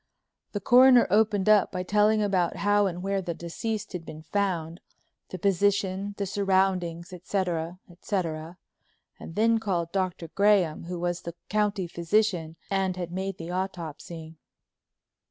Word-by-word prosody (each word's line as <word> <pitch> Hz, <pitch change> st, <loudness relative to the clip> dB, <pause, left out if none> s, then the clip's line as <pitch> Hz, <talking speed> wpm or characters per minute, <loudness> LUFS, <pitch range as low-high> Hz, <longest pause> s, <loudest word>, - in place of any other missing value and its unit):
The 205 Hz, -, -1 dB
Coroner 250 Hz, +3 st, +7 dB
opened 210 Hz, -1 st, +3 dB
up 215 Hz, -2 st, +5 dB
by 185 Hz, -1 st, -3 dB
telling 210 Hz, +2 st, +3 dB
about 185 Hz, -4 st, +1 dB
how 205 Hz, 0 st, +2 dB
and 180 Hz, -1 st, -5 dB
where 195 Hz, 0 st, 0 dB
the 175 Hz, -2 st, -4 dB
deceased 210 Hz, +6 st, -4 dB
had 180 Hz, -2 st, -5 dB
been 155 Hz, -1 st, -10 dB
found, 170 Hz, -2 st, -2 dB, 0.5 s
the 185 Hz, -, -6 dB
position, 200 Hz, +1 st, +1 dB
the 200 Hz, -, -1 dB
surroundings, 185 Hz, -3 st, 0 dB
etc., 175 Hz, -2 st, -2 dB
etc., 170 Hz, -2 st, -4 dB, 0.6 s
and 165 Hz, -, -9 dB
then 225 Hz, +1 st, +3 dB
called 175 Hz, -6 st, -2 dB
Dr. 185 Hz, -3 st, -2 dB
Graham, 195 Hz, -5 st, +2 dB
who 180 Hz, +1 st, -5 dB
was 175 Hz, 0 st, -2 dB
the 170 Hz, 0 st, -7 dB
county 210 Hz, -2 st, 0 dB
physician 170 Hz, -1 st, 0 dB, 0.2 s
and 190 Hz, -2 st, 0 dB
had 175 Hz, -2 st, -4 dB
made 190 Hz, +1 st, -3 dB
the 165 Hz, +1 st, -6 dB
autopsy. 165 Hz, -3 st, -6 dB
185 Hz, 140 wpm, -27 LUFS, 170-205 Hz, 0.6 s, Coroner